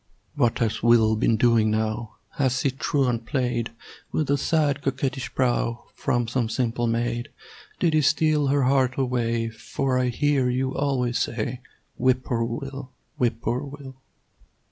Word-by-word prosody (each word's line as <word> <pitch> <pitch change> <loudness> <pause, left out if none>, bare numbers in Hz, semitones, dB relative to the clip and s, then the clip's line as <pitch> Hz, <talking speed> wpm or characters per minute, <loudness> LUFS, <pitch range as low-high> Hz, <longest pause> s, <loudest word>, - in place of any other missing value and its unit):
What 120 -1 +1
has 115 -2 -1
Will 115 -1 +5
been 110 +1 +2
doing 115 -1 +4
now? 110 0 -2 0.2
Has 130 -2 +1
he 140 - +2
truant 125 -3 0
played 120 -3 -1 0.4
With 150 -3 0
a - - +5
sad, 150 -2 +1
coquettish 135 -1 -2
brow 120 -2 0
From 120 -1 0
some 120 -1 -1
simple 120 -1 -1
maid? 120 +1 -1 0.5
Did 165 -2 +2
he 155 - +4
steal 150 0 +2
her 140 0 +2
heart 130 -1 +2
away? 115 -3 0
For 125 +3 -2
I 125 - +1
hear 135 +1 +1
you 130 +1 -1
always 130 -4 0
say 120 +2 -2 0.4
"Whip 130 0 +2
poor 115 -2 -1
Will! 135 +3 -5 0.3
Whip 115 -2 0
poor 120 +3 0
Will!" 140 -2 -9
125 Hz, 150 wpm, -25 LUFS, 115-135 Hz, 0.5 s, Will